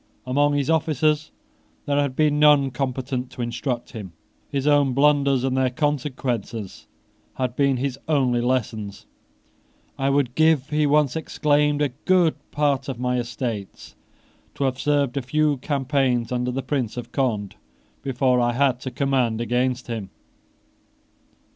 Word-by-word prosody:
Among 145 +3 +2
his 140 -2 0
officers 155 -1 +1 0.6
there 145 0 +1
had 140 -3 -2
been 150 0 +2
none 145 -3 +5
competent 130 0 -3
to 125 - -4
instruct 120 +1 -3
him. 100 -7 -8 0.4
His 135 -1 -2
own 145 -3 +3
blunders 140 -1 +3
and 130 -1 0
their 130 -1 +2
consequences 125 - -3 0.5
had 125 -2 -2
been 140 -2 +2
his 135 +1 -3
only 130 -6 +2
lessons. 110 -5 -2 0.9
"I 135 0 +1
would 140 -3 +1
give," 155 -2 +2
he 150 0 +2
once 145 -2 +3
exclaimed, 150 -2 +1
"a 145 - +1
good 165 +5 +2 0.2
part 140 -2 0
of 130 - -4
my 125 0 0
estates 115 -4 -5 0.6
to - - -2
have 130 -1 0
served 145 -3 +1
a - - +1
few 150 +2 +1
campaigns 130 -3 0
under 125 0 -1
the 130 +1 -3
Prince 125 -4 -2
of 120 - -6
Conde 110 -7 -1 0.5
before 130 -1 +1
I 120 0 +1
had 130 -1 +2
to 130 - -5
command 125 -3 0
against 125 +2 0
him." 110 -5 -5
135 Hz, 145 wpm, -23 LUFS, 125-145 Hz, 0.9 s, none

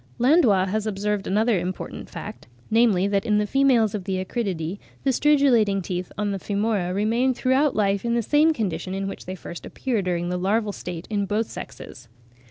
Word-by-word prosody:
Landois 240 - +4
has 215 +2 -1
observed 205 0 -2
another 215 0 +2
important 180 +1 -5
fact, - - -8 0.2
namely, 215 -5 +4
that 200 -1 +1
in 210 -3 +2
the 210 - +2
females 245 -3 +3
of 200 -4 -4
the 190 -1 -1
Acridiidae, 190 -5 -3 0.2
the 270 - +3
stridulating 255 -8 +3
teeth 180 0 -4
on 205 0 -1
the 195 - -3
femora 205 -2 -1
remain 230 +6 +1
throughout 265 +3 +2
life 200 -2 +1
in 235 0 0
the 235 - +1
same 300 +6 +4
condition 190 - -3
in 195 0 -2
which 195 - -7
they 185 - -4
first 175 -2 -9
appear 245 -6 -2
during 175 -2 -1
the 180 0 -2
larval 205 +3 +1
state 175 -2 -6
in 200 -2 0
both 215 +3 0
sexes. 120 - -10
210 Hz, 185 wpm, -24 LUFS, 190-235 Hz, 0.2 s, Landois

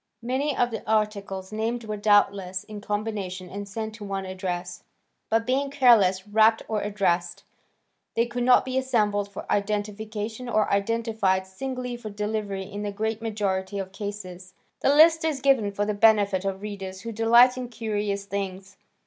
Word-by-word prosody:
Many 265 +4 -1
of 245 0 +2
the 220 - -4
articles 200 -3 -1
named 225 +2 -2
were 215 -1 -4
doubtless 200 -3 +2
in 210 -1 -9
combinations 205 -4 -4
and 200 0 -6
sent 220 +1 -4
to 220 -1 -10
one 195 -1 -3
address, 180 -1 -4 0.5
but 225 0 +2
being 270 +3 0
carelessly 210 -8 +4
wrapped 220 +1 +4
or 215 -2 -1
addressed, 180 -4 -1 0.7
they 230 - +3
could 240 +1 -4
not 250 +1 +5
be 260 0 0
assembled 210 -6 0
for 200 - -7
identification 215 +3 -2
or 215 -3 +1
identified 200 -2 +1
singly 250 +5 -5
for 230 -3 -7
delivery 210 -1 -3
in 205 +2 -7
the 205 -1 -3
great 220 +2 -2
majority 200 -3 -2
of 190 -1 -4
cases. 190 -3 -7 0.2
The - - +2
list 320 +1 +6
is 310 -4 0
given 260 -7 +3
for 205 +1 -1
the 210 - -1
benefit 205 -3 +3
of 195 0 -3
readers 195 -2 -6
who 230 - -5
delight 235 +3 +5
in 250 -1 -5
curious 210 -3 -2
things. 195 -1 -5
210 Hz, 165 wpm, -25 LUFS, 195-230 Hz, 0.7 s, list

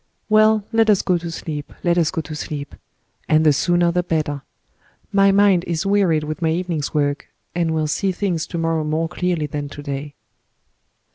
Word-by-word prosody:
"Well, 215 -1 +4
let 225 -1 +3
us 205 -3 +4
go 180 -2 +1
to 170 0 -6
sleep—let 165 +2 -3
us 165 -3 +2
go 160 - -2
to 155 0 -8
sleep; 145 -1 -5 0.6
and 155 0 +4
the 150 - +6
sooner 175 +3 +2
the 180 +1 +1
better. 155 -4 -2 0.7
My 195 0 +5
mind 195 -3 +4
is 170 +2 -2
wearied 195 -6 +2
with 155 +2 -5
my 165 - +2
evening's 165 -3 -2
work, 145 -1 -1 0.3
and 170 -1 0
will 160 -1 0
see 190 +6 0
things 180 -3 -2
to 170 - -5
morrow 165 -1 0
more 155 +2 -1
clearly 175 -2 -1
than 145 0 -4
to 145 0 -9
day." 140 0 -5
165 Hz, 185 wpm, -21 LUFS, 150-180 Hz, 0.7 s, the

